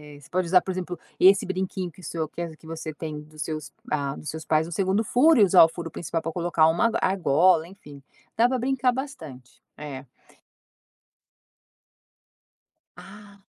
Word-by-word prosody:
eh, - - -14
você 145 - -18
pode 185 0 -1
usar, 180 +1 +5
por 190 - -4
exemplo, 180 -2 -5 0.2
esse 195 +1 +6
brinquinho 185 -1 -3
que 185 - -17
o - - -17
seu 160 -2 -3
que 170 - -7
as 165 -2 -5
que 160 - -18
você 160 -1 -6
tem 150 -1 -6
dos 155 0 -12
seus 155 0 -5 0.2
hã, 140 -2 -1
dos 150 - -7
seus 160 0 -6
pais 155 +1 +1
no - - -10
2º 195 +4 +1
furo 275 +4 +4
e - - +7
usar 185 -2 +7
o 165 - +4
furo 165 0 -7
principal 165 +1 -4
para 165 - -4
colocar 170 -2 +2
uma 175 +8 +2
argola 175 -2 +3
enfim, 150 -7 -14 0.3
dá 235 - +4
para 260 -1 -1
brincar 260 0 +1
bastante. 160 - -8 0.2
É. 140 -3 -8 2.9
Ah, 205 0 -14
170 Hz, 180 wpm, -25 LUFS, 155-195 Hz, 2.9 s, e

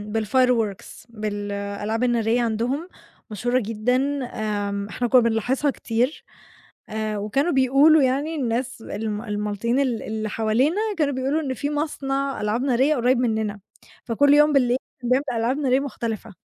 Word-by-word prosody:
بالfireworks 225 -2 0
بالألعاب 205 0 -3
النارية 240 -1 +2
عَندهم 240 +9 -1 0.4
مشهورة 245 +5 0
جدًا 225 +3 0 0.3
آمم 205 -3 -3
إحنا 245 +3 -2
كنا 250 +1 +6
بنلاحظها 240 +5 +1
كتير. 245 +4 -2 0.7
آآ 215 -1 -3
وكانوا 270 +11 0
بيقولوا 275 +3 +5
يعني 275 +5 0
الناس 250 -2 -2
ال - - -9 0.3
المالطيين 210 +4 -1
ال 250 -5 0
اللي 215 0 -3
حوالينا 225 - +1 0.2
كانوا 285 -3 +1
بيقولوا 270 +4 0
إن 270 -4 -3
في 285 +4 -3
مصنع 275 -3 -2
ألعاب 215 +4 -1
نارية 270 +3 +2
قُريب 245 0 +2
مننا 220 -4 -1 0.4
فكُلّ 285 +5 +4
يوم 295 +1 +5
بالليل 250 -3 +3 0.2
كان 245 - -4
بيعمل 265 +3 +3 0.2
ألعاب 250 +5 0
نارية 265 -2 +2
مختلفة. 225 -6 -5
245 Hz, 140 wpm, -23 LUFS, 215-270 Hz, 0.7 s, كنا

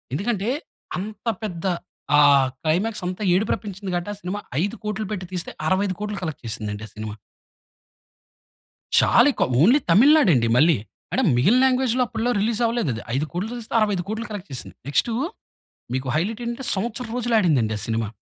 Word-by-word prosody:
ఎందుకంటే 210 +4 -1 0.5
అంత 215 +4 -7 0.2
పెద్ద 175 -4 -4 0.5
ఆహ్, 140 -2 +6 0.2
క్లైమాక్స్ 185 +7 0
అంత 180 0 -4
ఏడుపురప్పించింది 195 0 -2
కాబట్టి, 175 +4 -2
ఆ - - -8
సినిమా 185 +3 -3 0.2
5,00,00,000 210 +1 -3
పెట్టి 185 -3 -3
తీస్తే 180 -2 -3 0.2
65,00,00,000 200 +2 -1
కలెక్ట్ 160 -4 -4
చేసిందండి, 105 -2 -4
ఆ - - -15
సినిమా. 110 -1 -5 1.9
చాలా - - +5
ఎక్కువ. - - 0 0.2
ఓన్లీ 245 - +6
తమిళనాడు 270 - +6
అండి 115 -2 +2
మళ్ళీ. 155 +3 +5 0.4
అంటే - - +2
మిగిలిన 220 - +4
లాంగ్వేజ్‌లో 255 -1 +2
అప్పట్లో 230 +2 -1
రిలీజ్ 225 +2 0
అవ్వలేదు 230 - 0
అది. 110 - -6
5,00,00,000 170 - -2
తీస్తే 235 0 -8
65,00,00,000 210 +2 -1
కలెక్ట్ 205 -2 -7
చేసింది. 130 - -5
నెక్స్‌టూ 225 +10 +1 0.8
మీకు 130 +1 -2
హైలైట్ 210 +9 -1
ఏంటంటే, 240 +3 -4
సంవత్సరం 230 +4 -3
రోజులు 240 -1 -1
ఆడిందండి 135 - +2
ఆ - - -5
సినిమా. 115 -1 -1
195 Hz, 150 wpm, -23 LUFS, 155-225 Hz, 1.9 s, ఆహ్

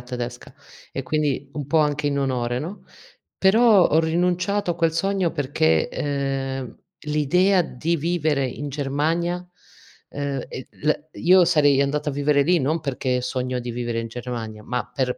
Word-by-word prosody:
tedesca, 120 0 -6 0.4
e - - -4
quindi 145 -3 -1
un 145 -3 -5
po' 145 - 0
anche 150 0 0
in 140 -1 0
onore, 125 -3 -1
no, 170 +9 -7 0.5
però 210 0 +5
ho 160 - +3
rinunciato 180 +4 0
a - - -5
quel 165 -1 +2
sogno 190 0 0
perché, 125 - +1
ehm, 135 -2 -3 0.3
l'idea 180 +6 +3
di 160 +3 -2
vivere 155 -3 0
in 140 +3 -5
Germania, 150 +5 -1 0.7
ehm, 140 -2 -3
e 130 - -7
la 150 +1 +3 0.2
io 180 +1 +5
sarei 145 -5 +4
andata 150 +2 0
a - - -3
vivere 145 0 +2
lì 175 +1 +3
non 155 +5 0
perché 130 -3 -1
sogno 125 0 -2
di 120 0 -5
vivere 120 -1 -3
in 115 - -6
Germania, 115 -3 -6
ma 125 0 -2
per 125 -2 -1
145 Hz, 160 wpm, -23 LUFS, 130-165 Hz, 0.7 s, però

